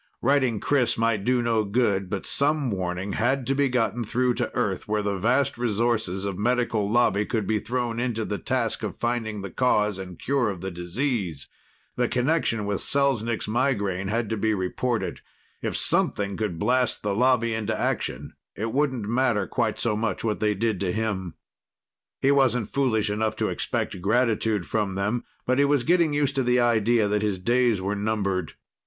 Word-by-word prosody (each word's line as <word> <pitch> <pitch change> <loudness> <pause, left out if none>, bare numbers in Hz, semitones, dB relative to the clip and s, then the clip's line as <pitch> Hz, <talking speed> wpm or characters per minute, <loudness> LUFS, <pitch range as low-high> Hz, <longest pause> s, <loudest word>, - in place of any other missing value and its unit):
Writing 130 -5 +2
Chris 125 -4 +1
might 115 -3 +1
do 125 +1 +2
no 115 -2 +2
good, 100 -3 0
but 100 -1 -3
some 145 -2 +1
warning 95 +1 -3
had 125 +3 +1
to 135 - +1
be 140 0 +2
gotten 120 -2 0
through 125 +3 +1
to - - -2
Earth, - - -1
where 105 0 0
the 100 -1 -1
vast 125 +5 +1
resources 110 -4 0
of 100 -1 -3
Medical 115 -2 +1
Lobby 105 -3 +3
could 110 -1 -2
be 110 +2 +1
thrown 120 +1 -2
into 120 -3 -1
the 105 - -3
task 125 -4 -1
of 105 -4 -4
finding 115 -4 -2
the 100 - -6
cause 105 -6 +1
and 90 -2 -8
cure 135 -5 0
of 95 -3 -5
the 95 0 -4
disease. 90 - -3 0.5
The 125 -1 +2
connection 125 -4 0
with 100 -1 -1
Selznik's 120 -5 +1
migraine 100 -5 0
had 115 +2 -1
to 110 - 0
be 110 +1 +1
reported. 110 +6 -2 0.4
If - - -2
something 100 -1 0
could 105 -6 -2
blast 125 +6 +1
the 105 -1 0
Lobby 115 0 +2
into 110 0 -2
action, - - -2 0.2
it 110 +2 -3
wouldn't 130 -5 0
matter 120 -3 +1
quite 115 -1 -1
so 115 -3 0
much 115 +2 -2
what 110 -2 -1
they 105 -1 +1
did 110 -1 0
to 95 -3 0
him. 100 -4 -2 0.9
He 135 - +5
wasn't 125 -5 +2
foolish 110 -6 +1
enough 110 +1 -1
to - - -1
expect 90 - -3
gratitude 110 -2 +1
from 105 -4 -1
them, 105 +5 -1 0.2
but 130 +2 +1
he 140 - +5
was 140 -3 +2
getting 170 0 +3
used 145 -2 +1
to 135 - +2
the 125 0 +3
idea 115 -2 +3
that 105 0 0
his 105 -3 0
days 120 +2 +2
were 100 +2 -1
numbered. 100 -5 -1
110 Hz, 185 wpm, -25 LUFS, 100-125 Hz, 0.9 s, He